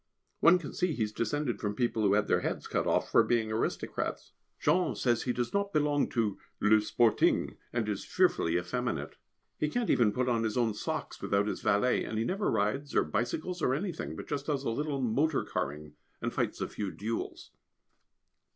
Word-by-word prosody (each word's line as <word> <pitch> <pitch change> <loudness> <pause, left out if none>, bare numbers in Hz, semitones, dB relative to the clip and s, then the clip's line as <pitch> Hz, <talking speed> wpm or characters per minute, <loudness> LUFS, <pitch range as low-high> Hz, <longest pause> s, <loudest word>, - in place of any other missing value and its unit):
One 170 +2 +7
can 165 -5 -7
see 180 -3 0
he 115 - 0
is 105 - -2
descended 120 +4 -1
from 105 -1 -2
people 120 -1 0
who 100 -2 +4
had 105 - +2
their - - +3
heads - - -3
cut - - -1
off - - +1
for - - +7
being 115 -2 +1
aristocrats. 110 - -2 0.3
Jean 180 0 +2
says 120 -3 +1
he 125 - -1
does 120 -1 -2
not 200 0 0
belong 145 -1 +2
to 110 -5 -1 0.2
le 105 +1 +5
Sporting, 110 +1 +2 0.2
and 120 -3 -1
is 105 -2 -2
fearfully 85 +1 +2
effeminate. 120 +7 -3 0.4
He 150 - +1
can't 240 +6 0
even 115 -4 +4
put 125 +4 -1
on 120 -2 +2
his 110 0 -1
own 115 -3 +2
socks - - -4
without 100 0 +1
his 105 - -3
valet, 105 +5 +2
and 110 - -4
he 110 - 0
never 195 - 0
rides 110 +7 -1
or - - +5
bicycles 155 - -2
or 130 - +2
anything, 175 +1 -4
but - - -8
just 145 -1 -3
does 140 -3 0
a 115 - 0
little 140 +2 -2
motor 140 +6 +1
carring, 75 +1 -4 0.3
and - - -3
fights - - -1
a - - 0
few 100 -2 -4
duels. 110 +4 -5
120 Hz, 195 wpm, -30 LUFS, 105-145 Hz, 0.4 s, One